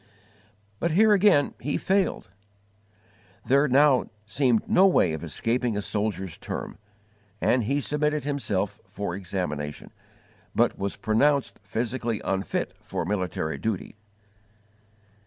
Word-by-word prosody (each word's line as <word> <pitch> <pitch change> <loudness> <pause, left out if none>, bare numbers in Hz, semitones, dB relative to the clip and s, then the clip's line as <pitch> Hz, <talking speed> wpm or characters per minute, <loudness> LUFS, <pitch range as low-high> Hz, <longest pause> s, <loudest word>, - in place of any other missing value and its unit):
But 170 - +1
here 210 +6 +5
again 195 -7 +4
he 145 - -2
failed. 190 - 0 1.2
There 140 +3 +4
now 135 0 +4 0.2
seemed 120 +1 +1
no 190 +2 +5
way 90 - +3
of 80 - -5
escaping 115 - -1
a - - -1
soldier's 100 -3 -2
term, - - -6 0.6
and 125 -3 +2
he 140 +5 0
submitted 150 0 0
himself 105 -8 -2
for 100 -2 -4
examination, 90 -6 -4 0.6
but - - +3
was 100 0 -3
pronounced 140 +5 +1
physically 115 +2 -2
unfit 95 0 -2
for - - -4
military 90 -5 -2
duty. 110 -2 -3
115 Hz, 115 wpm, -26 LUFS, 95-145 Hz, 1.2 s, here